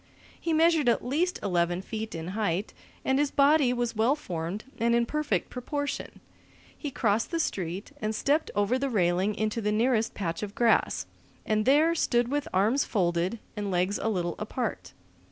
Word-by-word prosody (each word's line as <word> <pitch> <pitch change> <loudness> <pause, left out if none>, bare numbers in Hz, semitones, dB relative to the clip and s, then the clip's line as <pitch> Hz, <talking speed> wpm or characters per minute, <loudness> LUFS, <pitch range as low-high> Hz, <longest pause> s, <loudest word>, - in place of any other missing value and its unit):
He 335 - -1
measured 320 -4 +4
at 235 - +1
least 330 +8 0
eleven 175 -1 0
feet 220 -1 -5
in 165 +1 -5
height, 200 -1 -1 0.3
and 265 +1 +2
his 290 -1 +2
body 280 -2 +4
was 240 -2 -1
well 230 +6 +3
formed 180 - -5 0.2
and 235 +1 +3
in 235 0 +3
perfect 300 +4 -1
proportion. 285 +3 -4 0.5
He 295 - -5
crossed 220 -4 0
the 335 - -1
street 190 - -3
and 215 0 -1
stepped 295 +7 +1
over 205 +5 +2
the 275 0 -1
railing 190 -1 +1
into 215 +1 -1
the 210 0 0
nearest 225 +1 +1
patch 170 -4 -3
of 205 -1 -5
grass, 235 -2 +2 0.4
and 215 0 +1
there 305 +5 +5
stood 240 -7 +1
with 290 +1 -1
arms 215 +9 +3
folded 175 +1 0 0.2
and 205 -1 -3
legs 185 +2 0
a 225 - 0
little 175 -5 -1
apart. 210 - -4
225 Hz, 170 wpm, -28 LUFS, 195-275 Hz, 0.5 s, there